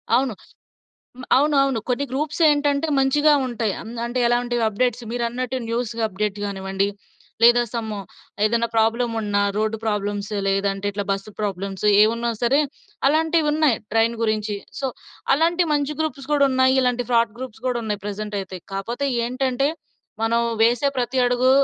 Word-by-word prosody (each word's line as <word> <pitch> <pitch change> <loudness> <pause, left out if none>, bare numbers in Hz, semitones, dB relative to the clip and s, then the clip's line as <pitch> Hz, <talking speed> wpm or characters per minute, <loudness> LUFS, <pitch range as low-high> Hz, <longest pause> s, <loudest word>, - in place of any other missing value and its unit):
అవును. 255 -1 +1 0.9
మ - - -7
అవునవును. 275 -4 +3
కొన్ని 255 +3 0
గ్రూప్స్ 295 +5 -3
ఏంటంటే 290 0 +2
మంచిగా 295 +3 +4
ఉంటాయి. 230 -4 -1
అం - - -10 0.2
అంటే 240 +2 -3
ఎలాంటివి 240 0 +1
అప్‌డేట్స్ 245 +3 -1
మీరన్నట్టు 245 +2 -2
న్యూస్ 235 0 -2
అప్‌డేట్స్ 205 0 -3
కానివ్వండి, 195 0 -1 0.6
లేదా 240 +1 +7
సమ్ 230 -2 -3 0.5
ఏదన్నా 230 +1 +1
ప్రాబ్లమ్ 230 +2 +2
ఉన్నా 205 -1 0 0.2
రోడ్డు 220 +1 0
ప్రాబ్లమ్స్, 205 -1 -2 0.2
లేదంటే 195 0 0
ఇట్లా 205 0 -3
బస్ 195 +1 -4
ప్రాబ్లమ్స్ 195 0 -3 0.2
ఏమున్నా 230 +2 +1
సరే, 270 +5 +4 0.5
అలాంటివున్నాయి 310 -3 +2 0.2
ట్రైన్ 225 +1 +3
గురించి. 215 -2 0 0.2
సో, 270 - 0 0.5
అలాంటి 335 +4 +2
మంచి 290 0 0
గ్రూప్స్ 280 -3 -3
కూడా 280 -1 +4
ఉన్నాయి. 260 0 +3
ఇలాంటి 245 -1 0
ఫ్రాడ్ 230 -2 +2
గ్రూప్స్ 255 -3 -8
కూడా 250 -1 0
ఉన్నాయి 210 -1 -3
ప్రజెంట్ 210 0 -4
అయితే. 190 -1 -7
కాకపోతే 235 +8 -3 0.2
ఏంటంటే 260 +2 0 0.5
మనం 230 +1 +2 0.2
వేసే 240 +4 +3
ప్రతి 250 +1 -1
అడుగు 250 +1 +3
240 Hz, 140 wpm, -22 LUFS, 215-265 Hz, 0.9 s, లేదా